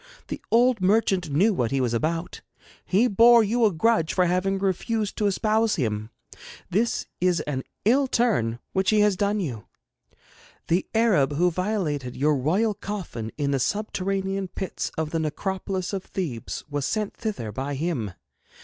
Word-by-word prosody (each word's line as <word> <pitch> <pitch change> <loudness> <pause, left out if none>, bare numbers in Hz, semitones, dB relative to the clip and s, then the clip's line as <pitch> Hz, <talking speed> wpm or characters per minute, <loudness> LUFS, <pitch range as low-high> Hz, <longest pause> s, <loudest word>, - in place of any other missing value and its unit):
The - - -5
old 240 -1 +4
merchant 190 -3 +2
knew 190 +10 +3
what 120 -10 0
he 135 - 0
was 125 -2 0
about. 165 +8 -2 0.4
He 210 +6 +3
bore 235 +2 +6
you 230 +3 +2
a 210 - +4
grudge 165 -1 +1
for 180 - +4
having 185 +2 +1
refused 200 +3 -1
to 210 - +2
espouse 215 +2 +1
him. 110 -5 -2 0.6
This 225 +6 +1
is 180 -2 +2
an 140 -4 -3 0.2
ill 265 +5 +4
turn 205 - +1 0.2
which 190 0 +1
he 215 -1 +4
has 210 -2 +3
done 205 +2 0
you. 125 - -4 1.0
The 175 +3 +1
Arab 185 -12 +3
who 175 +4 +2
violated 165 - -2
your 150 +3 +3
royal 185 - +1
coffin 180 - -5
in 145 -2 0
the 135 - +1
subterranean 195 - -1
pits 190 0 -4
of 155 -1 -2
the 165 - 0
necropolis 190 +4 -3
of 190 -1 -2
Thebes 145 -12 -5
was 145 -1 -3
sent 215 -2 -2
thither 160 - -4
by 135 +6 -3
him. 135 - -2
185 Hz, 160 wpm, -25 LUFS, 145-210 Hz, 1.0 s, bore